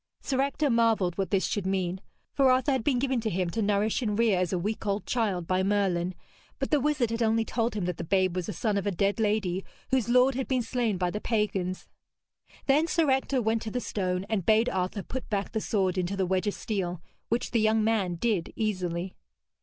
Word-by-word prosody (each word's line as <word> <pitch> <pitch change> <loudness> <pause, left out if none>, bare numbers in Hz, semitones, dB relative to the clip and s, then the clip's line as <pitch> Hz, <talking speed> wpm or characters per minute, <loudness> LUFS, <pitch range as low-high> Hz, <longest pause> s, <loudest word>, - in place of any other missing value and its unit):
Sir 265 -1 -1
Ector 280 +1 0
marvelled 225 -6 +2
what 195 - 0
this 195 -2 +1
should 200 -3 -2
mean; 190 -1 -1 0.3
for 270 -2 +4
Arthur 255 +3 +3
had 260 -4 0
been 270 -1 +2
given 260 -1 0
to 220 - -1
him 180 -2 -1
to 225 - -1
nourish 210 +2 +1
and 210 -4 -1
rear 225 -5 +3
as 180 -1 0
a 185 - 0
week 210 +5 -3
old 200 +1 -1
child 205 -8 0
by 185 +2 +1
Merlin, 190 -3 +1 0.4
but - - -3
the 300 - +4
wizard 280 -4 +1
had 230 +1 -2
only 225 0 +2
told 230 -1 -1
him 200 -4 -1
that 180 -2 -2
the - - -4
babe 185 +1 +1
was 180 +2 -3
a - - -1
son 210 -1 -1
of 200 - -2
a - - +2
dead 200 +4 0
lady, 205 -4 0 0.3
whose 255 -3 +1
lord 250 +2 +5
had 260 0 -3
been 255 -2 +1
slain 230 -4 -1
by 180 -1 0
the 210 - -4
pagans. 195 -5 -1 0.8
Then 295 +4 +3
Sir 325 -5 +2
Ector 265 -1 +1
went 220 +1 +1
to 225 - -4
the 250 - -2
stone 185 -5 -2
and 215 -4 -1
bade 220 +5 +4
Arthur 185 +2 -2
put 260 0 -6
back 200 -2 -2
the 220 - -2
sword 190 -4 0
into 185 +2 -2
the 190 - +1
wedge 185 +2 0
of 205 - -1
steel, 180 -5 -3 0.3
which 235 +2 -1
the 230 - +2
young 220 0 +3
man 210 -5 +1
did 190 -2 -1
easily. 185 -4 -2
210 Hz, 230 wpm, -28 LUFS, 185-235 Hz, 0.8 s, lord